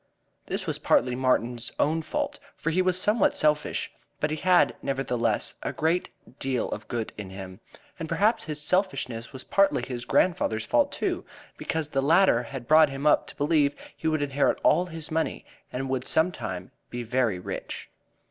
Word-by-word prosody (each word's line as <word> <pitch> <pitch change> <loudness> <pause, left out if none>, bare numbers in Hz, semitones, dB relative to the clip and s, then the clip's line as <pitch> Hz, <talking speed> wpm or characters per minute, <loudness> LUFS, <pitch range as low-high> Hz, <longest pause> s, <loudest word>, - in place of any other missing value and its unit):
This - - -3
was - - -2
partly 125 0 +2
Martin's 125 -2 0
own 160 +2 +2
fault, 155 - -3 0.2
for 165 - -1
he 185 +3 +2
was 185 0 +2
somewhat 210 +2 +3
selfish, 150 -1 +1 0.3
but 150 - 0
he 155 - -1
had, 180 +2 +4
nevertheless, 125 -5 0
a - - -2
great 165 +3 0 0.3
deal 130 -2 -1
of 110 +1 -5
good 115 -2 -3
in 100 -3 -6
him. 95 -1 -9 0.4
And 160 - -5
perhaps 205 +7 +2
his 150 -1 -2
selfishness 150 - 0
was 130 -2 -9
partly 195 0 +2
his 120 -2 -5
grandfather's 115 -12 +1
fault, - - +2
too, - - -2 0.3
because 160 -2 -2
the 135 -2 0
latter 160 -3 +4
had 125 0 -8
brought 155 -1 +7
him 135 +1 -5
up 150 - +4
to - - -10
believe 145 -1 +2 0.2
he 160 - -4
would 155 -2 +1
inherit 140 0 +1
all 175 +3 +4
his 165 -1 -7
money 160 - -1 0.3
and 135 +2 -3
would 130 -1 -1
sometime 105 - -1 0.2
be 120 0 -4
very 120 -4 +1
rich. 90 - -6
145 Hz, 175 wpm, -27 LUFS, 120-160 Hz, 0.4 s, brought